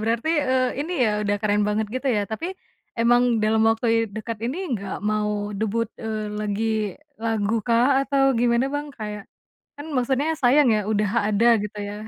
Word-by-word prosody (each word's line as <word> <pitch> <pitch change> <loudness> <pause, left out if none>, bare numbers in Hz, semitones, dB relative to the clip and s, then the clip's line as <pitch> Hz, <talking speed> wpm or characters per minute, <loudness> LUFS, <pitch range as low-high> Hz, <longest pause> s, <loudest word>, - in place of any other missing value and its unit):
berarti, 230 +6 -1 0.2
eee, 255 -1 +2
ini 335 +5 -3
ya, - - +3
udah 205 0 0
keren 210 -1 +1
banget 210 +1 0
gitu 260 +2 -3
ya, - - +2
tapi 320 +10 -3 0.5
emang 240 +1 +4 0.2
dalam 220 +1 +2
waktu 225 +1 0
i - - +3 0.2
dekat 220 0 -5
ini 260 +7 -2 0.2
nggak 195 -1 -6 0.2
mau 210 0 0 0.3
debut, 220 +1 -1 0.2
eee, 215 -1 -3
lagi 210 +1 -2 0.6
lagukah, 225 +1 +1 0.2
atau 275 0 +1 0.2
gimana 240 +2 +2
Bang? 290 +1 -2
Kayak 210 -1 -5 0.5
kan 290 +2 -8
maksudnya 265 +4 +1
sayang 260 +2 +5
ya - - +1
udah 205 -2 +1 0.2
ada 215 +3 +2 0.2
gitu 210 0 -6
ya. 205 - -6
225 Hz, 170 wpm, -23 LUFS, 210-250 Hz, 0.6 s, sayang